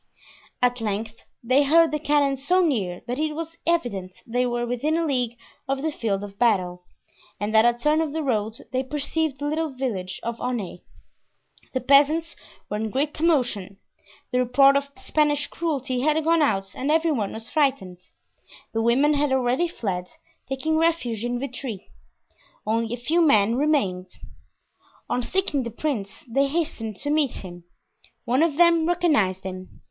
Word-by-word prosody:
At 245 -1 +2
length 220 +1 -4 0.2
they 255 +4 +4
heard 325 +3 +5
the 300 - -1
cannon 290 -2 +2
so 355 +8 +2
near 200 - -1
that 245 +3 -3
it 310 -1 -1
was 330 +1 -5
evident 200 - -1
they 245 +2 0
were 240 0 -1
within 255 +7 0
a 335 - 0
league 250 -5 -1 0.3
of 270 +1 -2
the 315 - 0
field 205 -7 -2
of 200 -1 -10
battle, 180 -6 +1 0.5
and 210 +2 -2
at 220 +1 +6
a 240 0 +3
turn 300 +5 +2
of 315 -3 -2
the 320 +1 -2
road 220 -4 -1
they 255 - 0
perceived 295 +2 -2
the 290 - -5
little 315 +2 -1
village 225 -9 -4
of 235 0 -4
Aunay. 230 -8 -3 0.9
The 260 - -1
peasants 295 +5 +4 0.3
were 210 - -3
in 220 +1 -2
great 285 +6 -1
commotion. 245 - 0 0.5
The 250 - +1
report 275 +3 +5
of 280 0 0
Spanish 295 -1 +1
cruelty 275 -6 -2
had 305 +4 +2
gone 330 +1 +3
out 195 -9 0
and 270 - -3
every 320 +1 +3
one 215 -9 -1
was 225 +1 -7
frightened. 265 - 0 0.7
The 225 - 0
women 260 +6 +3
had 290 -1 +1
already 260 +5 +2
fled, 185 - -4 0.4
taking 310 +4 0
refuge 315 -10 0
in 240 0 -1
Vitry; 250 -6 -6 0.7
only 225 +1 0
a 240 - -2
few 310 +8 +1
men 220 -9 +4
remained. 245 -11 +1 1.0
On 250 - 0
seeing 310 0 0
the 235 - -4
prince 230 -5 -4
they 275 +4 +2
hastened 275 -8 -2
to 290 +8 -3
meet 295 -8 0
him. 175 -1 -10 0.6
One 255 +4 +2
of 320 -3 +2
them 335 -2 +5
recognized 295 - +2
him. 185 0 -8
260 Hz, 165 wpm, -24 LUFS, 225-300 Hz, 1.0 s, at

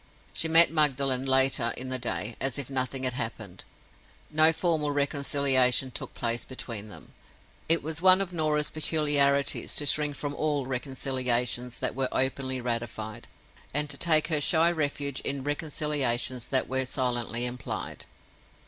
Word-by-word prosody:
She 165 - 0
met 165 +1 +6
Magdalen, 135 -4 +1
later 130 -3 +3
in 130 +1 -5
the 130 0 -3
day, 105 -1 -3
as 135 -1 -1
if 140 -1 -5
nothing 130 0 -2
had 130 -1 0
happened: 110 -6 -6 0.7
no 155 +1 +6
formal 160 -3 0
reconciliation 140 -3 +2
took - - -6
place 120 0 -1
between 115 -5 -6
them. - - -13 0.6
It 165 0 +4
was 160 +1 -3
one 185 0 +6
of 190 -2 -3
Norah's 155 -2 -1
peculiarities 145 -3 +1
to 145 - +2
shrink 150 0 +1
from 145 +1 -4
all 145 -2 -2
reconciliations 125 -2 -1
that - - -2
were 135 -1 -2
openly 130 0 0
ratified, 115 -2 -5 0.5
and 150 0 0
to - - -2
take 155 -1 +2
her 155 -3 +1
shy 165 +3 +4
refuge 145 -3 -3
in 140 -1 -4
reconciliations 145 -5 -1
that 130 - +1
were 130 0 -1
silently 120 -2 -1
implied. 125 -1 -6
135 Hz, 150 wpm, -27 LUFS, 125-150 Hz, 0.7 s, met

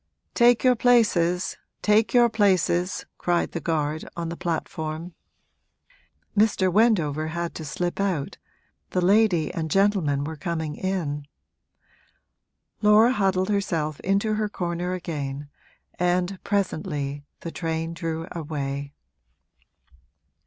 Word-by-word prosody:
'Take 240 -1 +4
your 255 -1 +5
places, 200 -8 +2 0.3
take 210 -1 +3
your 240 -1 +6
places!' 185 -4 +1
cried 175 -1 0
the 170 - -3
guard, 155 -1 -1
on 170 -1 -3
the 170 - -4
platform. 165 -1 -4 1.2
Mr. 200 -4 +3
Wendover 170 -9 +2
had 170 +1 -3
to 160 - -7
slip 175 +5 -3
out, 185 -8 -1 0.5
the 185 - 0
lady 195 -5 +3
and 160 -1 -3
gentleman 185 -7 +2
were 160 +2 -5
coming 160 -2 -3
in. 155 -7 -3 1.5
Laura 215 +3 +6
huddled 190 -3 +1
herself 165 -7 -1
into 200 +3 +1
her 215 0 -1
corner 175 -1 -3
again 145 -5 -5 0.5
and 180 +1 0
presently 155 -8 -2 0.2
the 165 - -5
train 165 0 -3
drew 165 0 -4
away. 140 -3 -4
175 Hz, 110 wpm, -25 LUFS, 155-200 Hz, 1.5 s, your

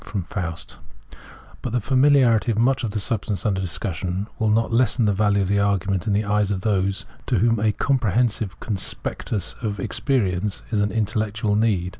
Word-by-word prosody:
f 90 -4 -5 0.8
But 120 - -4
the 125 - +2
familiarity 130 -2 +4
of 110 - -2
much 130 +3 +2
of 115 - -1
the 105 +1 -2
substance 105 -1 -2
under 95 -3 +1
discussion 90 +2 -3
will 110 - +2
not 115 +2 +1
lessen 115 -1 +2
the 105 - +3
value 100 0 +2
of - - -2
the 100 +1 +2
argument 100 -2 0
in 105 - +2
the 105 +1 +1
eyes 105 -1 +1
of 95 -2 -1
those 100 0 0 0.2
to 120 - +2
whom 115 +2 +2
a 105 0 +2
comprehensive 115 - 0
conspectus 105 -1 -4
of 105 -3 -3
experience 105 -7 -1
is 105 -2 +1
an 105 0 0
intellectual 110 -1 -1
need. 105 -5 +1
105 Hz, 175 wpm, -23 LUFS, 100-115 Hz, 0.8 s, familiarity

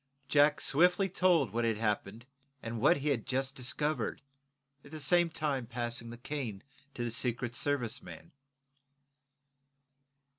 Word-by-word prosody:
Jack 145 +1 +4
swiftly 180 +6 +3
told 180 -2 +3
what 120 +1 0
had 115 -2 +1
happened, 105 +1 -2 0.4
and 115 -1 -4
what 150 +7 +5
he 145 +2 -1
had 125 -6 -1
just 135 +1 -1
discovered, 140 +1 -1 0.6
at - - -14
the 155 +1 -6
same 175 +4 +3
time 145 -6 -2
passing 120 -1 -2
the 120 - -8
cane 120 -6 -5 0.3
to 120 - -3
the 120 - -2
Secret 120 0 -1
Service 125 -3 -1
man. 170 -1 -11
130 Hz, 140 wpm, -32 LUFS, 115-150 Hz, 0.6 s, what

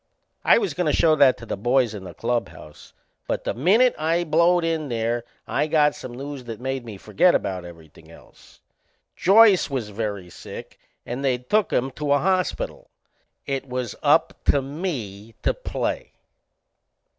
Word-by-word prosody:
I - - +6
was 415 -4 -1
goin' 180 -2 -1
to 150 - +2
show 160 -2 +4
that 140 -3 +5
to 115 - -10
the - - -3
boys 120 +2 +1
in 100 -3 -8
the 90 - -10
clubhouse, 115 -10 -5 0.3
but - - -2
the - - -2
minute 210 - +4
I 165 +3 +1
blowed 170 +2 +3
in 160 -3 -1
there 115 0 -1 0.2
I 150 +2 0
got 150 -2 +3
some 125 - -9
news 140 0 -7
that 115 -2 -7
made 130 0 -3
me 110 -4 -9
forget 110 - +3
about 90 -2 -2
everything 85 -3 -14
else. - - -18 0.5
Joyce 200 -1 +5
was 125 -6 -3
very 100 -4 -4
sick - - -10 0.3
and 125 +3 -5
they'd 125 -2 -1
took 215 -1 +3
him 130 +2 0
to 145 +1 -1
a - - +4
hospital. 190 - -1 0.6
It 135 -1 -3
was 125 -2 -3
up - - +3
to 140 - +4
me 120 - -5
to - - +2
play! - - -4
135 Hz, 170 wpm, -23 LUFS, 115-165 Hz, 0.6 s, I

